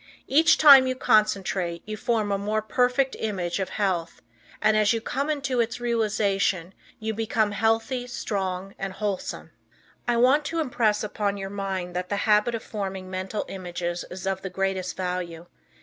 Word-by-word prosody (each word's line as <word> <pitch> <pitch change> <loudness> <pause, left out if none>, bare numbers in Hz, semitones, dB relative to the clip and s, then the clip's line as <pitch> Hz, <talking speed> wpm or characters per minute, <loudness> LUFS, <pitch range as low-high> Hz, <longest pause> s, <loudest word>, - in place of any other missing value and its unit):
Each 315 +5 +5
time 275 -4 +9
you 255 - -1
concentrate 195 -7 +1
you 215 - -5
form 215 -1 0
a 200 - +1
more 215 +2 -1
perfect 250 +4 +1
image 190 -5 -2
of 190 - -2
health, 185 -5 -1 0.4
and, 215 0 +3
as 215 +1 +4
you 230 - 0
come 275 +6 -2
into 275 -4 -1
its 235 +1 0
realization, 200 -6 0 0.2
you 220 0 -3
become 220 -1 0
healthy, 225 +4 0
strong 195 -5 -3
and 195 -1 -4
wholesome. 195 0 -4 0.6
I 240 -1 +2
want 260 +5 +4
to 330 +2 -2
impress 230 -8 +1
upon 205 -1 -2
your 195 0 -5
mind 190 -3 -4
that 180 0 -3
the 205 - 0
habit 210 +2 +3
of 225 - -5
forming 190 -3 -5
mental 190 +3 -3
images 175 -2 -4
is 185 +1 -7
of 190 0 -1
the 190 - -5
greatest 190 0 -2
value. 180 -2 -4
205 Hz, 165 wpm, -25 LUFS, 190-230 Hz, 0.6 s, time